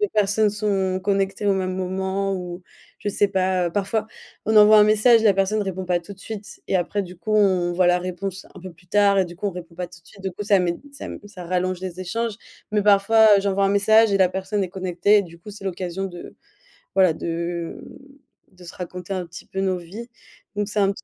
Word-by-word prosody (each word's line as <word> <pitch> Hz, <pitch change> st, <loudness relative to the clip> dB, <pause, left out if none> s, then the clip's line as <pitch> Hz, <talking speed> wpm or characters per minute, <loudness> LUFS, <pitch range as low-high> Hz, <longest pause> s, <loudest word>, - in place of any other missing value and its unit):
les 415 Hz, -, +2 dB
personnes 210 Hz, +1 st, +2 dB
sont 195 Hz, -3 st, -1 dB
connectées 195 Hz, +1 st, 0 dB
au 200 Hz, -, +4 dB
même 185 Hz, -1 st, -1 dB
moment 190 Hz, +1 st, -2 dB
où 180 Hz, 0 st, -6 dB, 0.4 s
je 205 Hz, -, -4 dB
sais 205 Hz, -, +2 dB
pas, 185 Hz, -1 st, +1 dB
heu. 170 Hz, -, -2 dB
Parfois 205 Hz, +2 st, -1 dB, 0.4 s
on 220 Hz, -, +2 dB
envoie 215 Hz, 0 st, +8 dB
un 210 Hz, -, +8 dB
message, 220 Hz, +2 st, +5 dB
la 205 Hz, -3 st, +5 dB
personne 200 Hz, +2 st, +1 dB
répond 190 Hz, -1 st, -4 dB
pas 175 Hz, -1 st, 0 dB
tout 170 Hz, +4 st, -11 dB
de -, -, -28 dB
suite, 215 Hz, 0 st, -9 dB
et -, -, -2 dB
après 195 Hz, +3 st, -1 dB
du 180 Hz, -1 st, -10 dB
coup, 215 Hz, +5 st, -2 dB
on 185 Hz, -4 st, +3 dB
voit 180 Hz, 0 st, +2 dB
la 180 Hz, 0 st, +4 dB
réponse 185 Hz, +2 st, -5 dB
un 190 Hz, -, -11 dB
peu 185 Hz, -1 st, -9 dB
plus 180 Hz, +2 st, -24 dB
tard 200 Hz, 0 st, +4 dB
et 190 Hz, -, +4 dB
du 175 Hz, 0 st, -11 dB
coup, 205 Hz, -, -3 dB
on -, -, 0 dB
répond 175 Hz, -1 st, -9 dB
pas 180 Hz, 0 st, -3 dB
tout 170 Hz, 0 st, -16 dB
de 165 Hz, -, -29 dB
suite, 200 Hz, -2 st, -16 dB
du 190 Hz, -, -2 dB
coup 205 Hz, -, -6 dB
ça 200 Hz, -1 st, +4 dB
met 175 Hz, -1 st, 0 dB, 0.2 s
ça 280 Hz, -, -9 dB
m -, -, -7 dB
ça 185 Hz, -3 st, -10 dB
rallonge 185 Hz, +1 st, -1 dB
les 185 Hz, -1 st, -6 dB
échanges, 225 Hz, +4 st, -2 dB, 0.4 s
mais 210 Hz, -1 st, +2 dB
parfois, 210 Hz, +2 st, +5 dB
heu, -, -, +2 dB
j'envoie 200 Hz, 0 st, +1 dB
un -, -, +1 dB
message 220 Hz, +2 st, +4 dB
et -, -, +4 dB
la 190 Hz, -1 st, +5 dB
personne 190 Hz, +2 st, -2 dB
est -, -, -5 dB
connectée 185 Hz, +2 st, +2 dB
et 200 Hz, -, +2 dB
du 170 Hz, -2 st, -13 dB
coup 190 Hz, +5 st, -11 dB
c'est 205 Hz, -1 st, -11 dB
l'occasion 185 Hz, 0 st, -3 dB
de, 175 Hz, -2 st, -10 dB, 0.6 s
voilà, 185 Hz, -4 st, +4 dB
de 170 Hz, +1 st, -4 dB, 0.7 s
de 185 Hz, -1 st, -17 dB
se 170 Hz, -, -10 dB
raconter 180 Hz, +1 st, -6 dB
un 185 Hz, -2 st, -3 dB
petit 170 Hz, +1 st, -12 dB
peu 190 Hz, -, -4 dB
nos 190 Hz, -1 st, 0 dB
vies, 195 Hz, +8 st, -9 dB, 0.5 s
donc 205 Hz, 0 st, -1 dB
c'est 210 Hz, -, -6 dB
un 195 Hz, -1 st, +3 dB
petit 200 Hz, -, -10 dB
190 Hz, 245 wpm, -23 LUFS, 180-205 Hz, 0.7 s, envoie